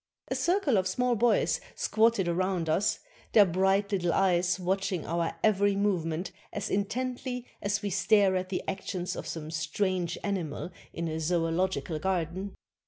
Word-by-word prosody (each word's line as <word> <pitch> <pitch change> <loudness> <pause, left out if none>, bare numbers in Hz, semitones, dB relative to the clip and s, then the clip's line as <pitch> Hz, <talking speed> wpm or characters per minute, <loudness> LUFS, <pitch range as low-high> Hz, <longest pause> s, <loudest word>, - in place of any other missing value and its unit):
A - - -1
circle 345 - +2
of 190 0 +1
small 245 +6 +1
boys 235 +2 +2
squatted 220 -4 +2
around 180 -1 0
us, 195 +7 +2 0.4
their 210 -2 +8
bright 190 +3 +2
little 175 -4 +1
eyes 180 -1 +2
watching 190 -1 -1
our 170 0 -1
every 205 -1 +3
movement 180 -3 0 0.2
as 205 - -4
intently 250 +4 -2 0.2
as 200 0 -1
we 200 - -1
stare 200 0 +4
at 185 0 -2
the 185 - -2
actions 190 -2 -3
of - - -6
some 155 -1 -5
strange 170 +2 -1
animal 180 -4 -3 0.2
in 170 0 -3
a 160 0 -3
zoological 165 0 0
garden. 185 +2 -2
190 Hz, 150 wpm, -29 LUFS, 170-205 Hz, 0.4 s, their